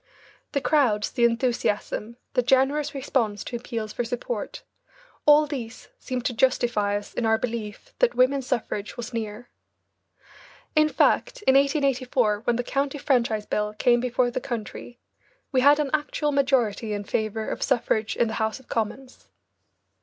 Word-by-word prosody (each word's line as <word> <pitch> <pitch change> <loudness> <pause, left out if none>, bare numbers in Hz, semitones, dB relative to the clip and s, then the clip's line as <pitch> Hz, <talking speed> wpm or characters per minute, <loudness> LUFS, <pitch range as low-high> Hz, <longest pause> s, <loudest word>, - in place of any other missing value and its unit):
The 280 - 0
crowds, 250 -10 +2
the 240 - +2
enthusiasm, 235 -1 -1 0.2
the 250 - +3
generous 270 +4 +2
response 235 -6 -1
to - - -6
appeals 230 -3 -5
for 240 - -2
support, 245 - -4 0.6
all 300 +1 +7
these 250 -5 -7
seemed 250 -1 -4
to 245 - 0
justify 235 -4 +1
us 205 - -9
in 240 - -2
our 220 0 +3
belief 230 - -5
that - - +3
women's 260 +1 +2
suffrage 215 -4 -3
was 240 +1 -6
near. 225 +1 -5 1.2
In 305 0 +5
fact, - - +1
in 265 - +4
1884, 265 -6 +2
when 240 - +2
the 245 - -1
County 275 +3 -1
Franchise 235 -6 +1
Bill 210 0 -2
came 240 +2 +3
before 250 0 0
the - - -3
country, 240 0 -6 0.5
we 260 -3 +3
had 285 +2 +6
an 290 -3 -1
actual 300 0 0
majority 245 -6 +1
in 205 0 -3
favour 215 +1 -2
of - - -4
suffrage 225 -4 0
in 235 - +3
the 220 - -4
House 220 +3 -1
of 265 - -20
Commons. 250 +4 -4
245 Hz, 155 wpm, -25 LUFS, 220-275 Hz, 1.2 s, all